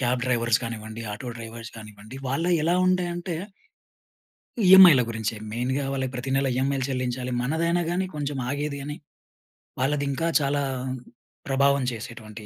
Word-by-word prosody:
Cab 125 0 +1
drivers 120 -2 +2
గానివ్వండి, 110 -1 -6
auto 120 +4 -6
drivers 115 +1 -8
గానివ్వండి. 110 +2 -11
వాళ్ళు 165 +7 0
ఎలా 170 +3 +2
ఉండె 185 -1 +2
అంటే 175 -1 -4 1.3
ఈఎంఐల 180 -7 +9
గురించే 110 -1 -3 0.2
మెయిన్‌గా 130 +4 -1
వాళ్ళకి 130 -1 -2
ప్రతి 125 +2 -4
నెల 135 0 +1
ఈఎంఐలు 135 0 0
చెల్లించాలి. 125 -1 -2
మనదైనా 170 +6 +1
గాని 185 +2 0
కొంచెం 145 -1 -3
ఆగేది 145 0 -3
గాని 145 +1 -5 0.9
వాళ్ళది 145 +2 +1
ఇంకా 165 +5 -1
చాలా 140 0 0 0.8
ప్రభావం 140 0 +3
చేసేటువంటి 110 -2 -9
135 Hz, 135 wpm, -25 LUFS, 115-145 Hz, 1.3 s, ఈఎంఐల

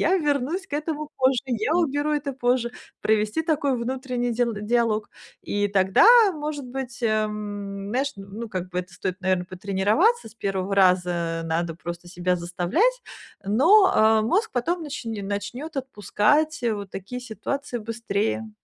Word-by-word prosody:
Я 370 +4 +3
вернусь 300 +3 -1
к - - -24
этому 305 0 -3
позже. 260 -1 +2
Я 245 +5 0
уберу 300 -3 +1
это 285 -2 -1
позже". 245 -1 0 0.3
Провести 215 +7 +1
такой 295 -5 +1
внутренний 250 0 -2
дил 235 -1 0
диалог. 215 0 0 0.3
И 205 0 0
тогда, 190 - +4 0.3
может 295 -2 -4
быть, 250 -1 -6
э, 230 - +3 0.2
м, 205 -1 -5
знаешь, 270 +4 0
ну, 200 +4 -7
как 185 -2 -4
бы 180 - -3
это 180 0 -13
стоит, 185 +1 -4
наверно, 185 -1 +1
потренироваться. 205 - +1
C 225 - -18
1 195 0 -2
раза 175 -3 +2
надо 165 0 -1
просто 175 +1 -7
себя 180 0 0
заставлять. 180 - 0 0.4
Но, 330 - +5
а, 220 0 +5
мозг 405 - +1
потом 335 +8 -1
начн 275 -6 -5 0.2
начнёт 240 +10 -5
отпускать, 265 - +1
э, 230 -2 +1
вот 200 -2 -7
такие 200 +7 -6
ситуации 250 +2 -4
быстрее. 225 -1 -2
230 Hz, 150 wpm, -24 LUFS, 195-280 Hz, 0.4 s, Но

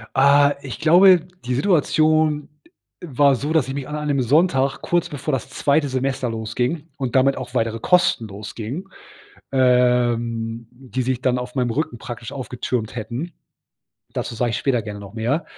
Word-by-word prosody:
Ah, 140 +1 +5
ich 125 -6 -7
glaube, 180 +2 +6 0.2
die 125 0 -2
Situation 155 -1 +2 0.6
war 140 -3 +3
so, 145 +5 -3
dass 160 -5 +2
ich 135 - -4
mich 140 -1 -5
an 150 - -5
einem 150 -2 0
Sonntag 135 0 +2
kurz 175 -1 0
bevor 150 +1 -4
das 135 -2 -3
zweite 140 +2 +1
Semester 130 -1 -1
losging 125 +8 -3
und 130 -3 -3
damit 135 +1 +4
auch 130 - -8
weitere 115 0 0
Kosten 175 -8 +2
losgingen, 110 - -7 0.6
ähm, 120 -3 +1
die 130 0 -5
sich 125 0 -1
dann 130 -1 +1
auf 125 0 -6
meinem 125 -2 0
Rücken 120 -1 -2
praktisch 115 +2 -8
aufgetürmt 125 -3 -4
hätten 125 +9 -5 0.8
dazu - - -3
sage 120 +1 0
ich - - -1
später 130 -4 0
gerne 105 -1 -7
noch 100 -1 -10
mehr, 120 +8 -1
130 Hz, 160 wpm, -21 LUFS, 120-145 Hz, 0.8 s, glaube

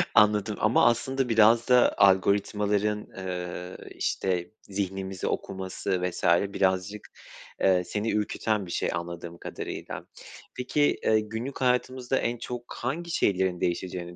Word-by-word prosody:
Anladım 105 0 +4
ama 110 +2 +4
aslında 130 +2 +1
biraz 115 +1 +5
da 125 -1 +5
algoritmaların, 105 +2 +2
eee, 90 -1 -5 0.2
işte, 90 -1 -1
zihnimizi 95 -1 -4
okuması 95 -1 -3
vs. 90 -1 -3 0.3
birazcık, 95 +2 0 0.6
ııı, 90 -2 +4
seni 105 +2 -2
ürküten 105 -1 -1
bir 85 - -8
şey - - 0
anladığım 85 0 -6
kadarıyla. - - -6 0.5
Peki, 145 +3 +1
eee, 110 - +4
günlük 110 +6 -5
hayatımızda 130 +1 +1
en 120 +1 -1
çok 120 +1 -7
hangi 165 +8 -3
şeylerin 95 - +1
değişeceğini 90 0 -3
105 Hz, 120 wpm, -27 LUFS, 95-115 Hz, 0.6 s, biraz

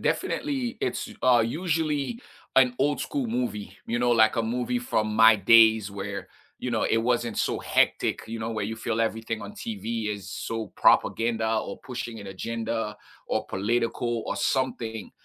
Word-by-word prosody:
definitely 265 -5 -1
it's, 125 - -2
uh, 120 -2 +5
usually 160 - -1 0.4
an 125 -2 +5
old 145 +1 +1
school 280 -4 -2
movie, 120 - -3
you 120 +1 -1
know, 120 0 +2
like 110 -1 +4
a 115 - +2
movie 125 - -1
from 110 - -1
my 110 0 +7
days 110 0 +6
where, 100 -1 -5 0.3
you 125 - -3
know, 115 - 0
it 115 - +2
wasn't 120 -1 0
so - - 0
hectic, - - +1
you 115 0 -5
know, 110 +1 -3
where 110 -2 -2
you 110 +2 -4
feel 115 0 -2
everything 115 0 -2
on - - -8
TV 115 - -4
is 100 -1 -10
so 115 +2 -4
propaganda 115 -1 +3
or 100 - -5
pushing 120 -3 -6
an 100 - -9
agenda 115 +2 -3 0.3
or - - -1
political 115 +3 -1
or - - -2
something. 115 -5 -1
115 Hz, 165 wpm, -26 LUFS, 110-125 Hz, 0.4 s, my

